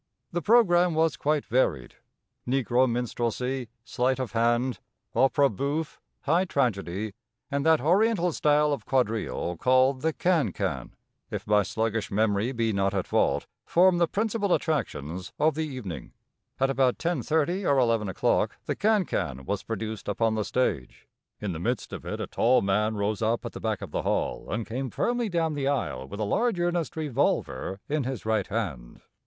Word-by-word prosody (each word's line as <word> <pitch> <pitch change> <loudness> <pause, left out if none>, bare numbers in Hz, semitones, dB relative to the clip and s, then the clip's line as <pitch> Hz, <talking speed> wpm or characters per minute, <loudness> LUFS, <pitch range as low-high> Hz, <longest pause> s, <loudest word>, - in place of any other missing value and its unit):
The 175 - -1
programme 180 -5 +4
was 160 -1 +2
quite 150 0 0
varied. 110 - 0 0.5
Negro 130 0 +2
minstrelsy, 125 +1 -2
sleight 125 +2 0
of 130 -6 -3
hand, 120 +3 +1 0.3
opera 140 +1 +4
bouffe, 140 +7 -3 0.2
high 165 +5 +2
tragedy, 105 - -1 0.4
and 140 0 0
that 160 -1 +5
oriental 180 - +3
style 150 -1 +3
of 140 - -5
quadrille 110 -8 0
called 130 - +3
the 160 +2 +1
khan 160 - +1
khan, - - -3 0.3
if - - -5
my 105 0 +4
sluggish 110 +2 -2
memory 105 +3 +1
be 115 -3 0
not 100 0 0
at 95 - 0
fault, - - +1 0.2
formed 175 0 +4
the 170 - +4
principal 205 0 +1
attractions 95 - -3
of 155 +1 +3
the 155 +1 -2
evening. 125 - -7 0.5
At 135 0 +2
about 130 -2 +2
10:30 170 +3 0
or 140 - +3
11 115 -5 +2
o'clock 95 - +1
the - - -1
khan 215 -2 +2
khan 65 - -3
was 100 +4 -2
produced 110 -1 -5
upon 110 +2 +1
the 110 -1 0
stage. 100 - -2 0.3
In 105 -2 -3
the 80 - -5
midst 120 +8 -2
of - - -7
it - - -4
a - - -2
tall 125 -1 +2
man 105 +3 +1
rose 105 +1 -1
up 115 +1 0
at - - -4
the - - -9
back - - -2
of - - -8
the - - -1
hall, - - -1
and 110 +1 -2
came 130 +3 -3
firmly 240 - -1
down 165 -3 0
the 140 -2 -1
aisle 65 - -1
with 100 - -8
a - - 0
large, 205 - +1
earnest 175 -2 -1
revolver 115 - -1
in 150 -1 0
his 130 -4 -4
right 110 0 +1
hand. 90 - -4
130 Hz, 170 wpm, -27 LUFS, 110-155 Hz, 0.5 s, that